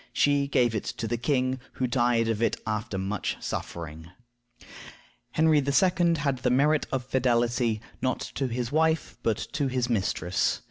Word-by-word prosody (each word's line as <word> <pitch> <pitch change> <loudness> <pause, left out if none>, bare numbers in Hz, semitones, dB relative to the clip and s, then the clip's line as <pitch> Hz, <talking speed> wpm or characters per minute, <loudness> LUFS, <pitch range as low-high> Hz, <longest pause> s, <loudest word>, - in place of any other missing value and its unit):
She 145 -1 +3
gave 120 -4 +2
it 110 - -2
to 115 - -3
the 120 - 0
king, 130 +1 0
who 130 - -1
died 120 -2 +2
of 115 -1 -1
it 115 - +1
after 110 -2 -2
much 95 +1 -2
suffering. 80 -1 -6 1.2
Henry 160 -1 +4
II. 170 +4 +3
had 140 -4 -1
the - - +1
merit 145 +4 +3
of 130 -2 -1
fidelity, 120 -3 +1 0.2
not 130 -1 0
to 135 - -1
his 120 0 -3
wife, 160 +1 +1
but 110 -2 +1 0.2
to 145 - 0
his 125 -2 -1
mistress. 95 -4 0
125 Hz, 155 wpm, -27 LUFS, 115-140 Hz, 1.2 s, Henry